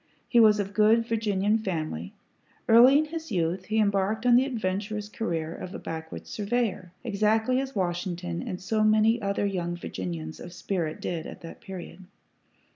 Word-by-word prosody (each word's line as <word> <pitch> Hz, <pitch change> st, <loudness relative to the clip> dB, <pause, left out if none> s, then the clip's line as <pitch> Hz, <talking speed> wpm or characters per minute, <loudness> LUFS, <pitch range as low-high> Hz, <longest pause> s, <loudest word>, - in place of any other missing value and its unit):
He 240 Hz, -, +4 dB
was 215 Hz, -2 st, +6 dB
of 200 Hz, 0 st, -3 dB
good 220 Hz, +2 st, +4 dB
Virginian 215 Hz, -2 st, +1 dB
family. 155 Hz, -, -3 dB, 0.6 s
Early 245 Hz, +5 st, +8 dB
in 310 Hz, -, +2 dB
his 320 Hz, 0 st, -7 dB
youth, 180 Hz, 0 st, -1 dB
he 215 Hz, +2 st, -1 dB
embarked 205 Hz, +1 st, +1 dB
on 245 Hz, -1 st, +6 dB
the 255 Hz, +2 st, +5 dB
adventurous 210 Hz, -3 st, -3 dB
career 170 Hz, -8 st, -3 dB
of 185 Hz, -, -7 dB
a -, -, -3 dB
backwoods 160 Hz, 0 st, -7 dB
surveyor, 205 Hz, -4 st, -1 dB
exactly 220 Hz, +3 st, +2 dB
as 270 Hz, -1 st, -4 dB
Washington 175 Hz, -2 st, -2 dB
and 200 Hz, -8 st, -5 dB
so 215 Hz, +3 st, 0 dB
many 215 Hz, +2 st, +4 dB
other 200 Hz, 0 st, 0 dB
young 175 Hz, -3 st, -2 dB
Virginians 85 Hz, -, -5 dB
of 175 Hz, -, -9 dB
spirit 175 Hz, -4 st, -3 dB
did 165 Hz, -3 st, -3 dB
at -, -, -10 dB
that 165 Hz, +7 st, -10 dB
period. 190 Hz, -3 st, -9 dB
200 Hz, 165 wpm, -27 LUFS, 175-225 Hz, 0.6 s, Early